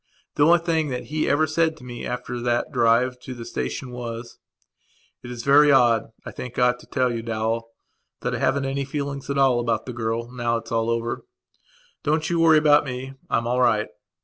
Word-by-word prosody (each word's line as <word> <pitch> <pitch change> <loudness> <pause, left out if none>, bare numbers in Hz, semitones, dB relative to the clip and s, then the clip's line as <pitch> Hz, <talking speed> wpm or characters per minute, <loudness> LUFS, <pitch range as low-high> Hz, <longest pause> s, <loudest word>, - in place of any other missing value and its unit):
The 145 - +4
only 170 +1 +7
thing 165 -2 0
that 125 -1 -3
he 155 - +1
ever 145 +3 +3
said 160 +1 0
to 145 - -15
me 120 -1 -7
after 125 0 -4
that 120 0 0
drive 120 +2 +2
to 125 0 -8
the 120 -1 -8
station 65 - -4
was: 120 -1 -7 0.8
"It's 120 -1 -7
very 145 +1 +6
odd. 120 -4 +3
I - - -6
think 125 -1 -8
I 125 0 +4
ought 125 0 -2
to - - -16
tell 130 -2 0
you, 115 - -3
Dowell, 115 0 -2 0.5
that - - -2
I - - -2
haven't 140 0 +1
any 135 +1 -1
feelings 140 0 -5
at 140 - -1
all 135 -3 +4
about 115 -2 -1
the 125 - -6
girl 115 0 -3
now 120 -2 -1
it's 115 0 -9
all 115 0 0
over. 115 0 -2 0.8
Don't 155 +2 0
you 170 - +1
worry 165 -1 +6
about 150 -1 +5
me. 130 0 -6 0.2
I'm 115 - +1
all 125 +2 +1
right." 110 -3 +2
125 Hz, 205 wpm, -23 LUFS, 115-140 Hz, 0.8 s, only